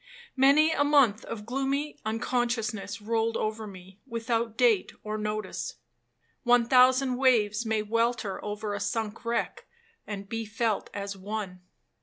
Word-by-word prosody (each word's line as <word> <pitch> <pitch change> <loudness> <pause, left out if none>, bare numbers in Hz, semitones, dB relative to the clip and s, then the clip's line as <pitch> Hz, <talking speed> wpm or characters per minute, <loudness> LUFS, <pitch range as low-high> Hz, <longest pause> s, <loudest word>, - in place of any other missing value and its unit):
Many 285 +4 +5
a 285 - +2
month 275 -8 +4
of 210 -2 -6
gloomy 275 +4 -2
unconsciousness 220 -3 -2
rolled 225 +1 0
over 215 0 -3
me, 190 0 -12
without 230 -1 -2
date 235 -6 +3
or 215 0 -3
notice. 210 0 -3 0.7
One 245 -1 +4
thousand 255 +1 +4
waves 230 -4 +2
may 220 -1 +1
welter 230 -1 -1
over 210 0 -4
a 205 - -3
sunk 215 +1 -3
wreck, 235 0 -2 0.4
and 200 -1 -6
be 225 +2 -3
felt 220 0 -1
as 200 0 -5
one. 195 -2 -5
225 Hz, 135 wpm, -28 LUFS, 210-245 Hz, 0.7 s, Many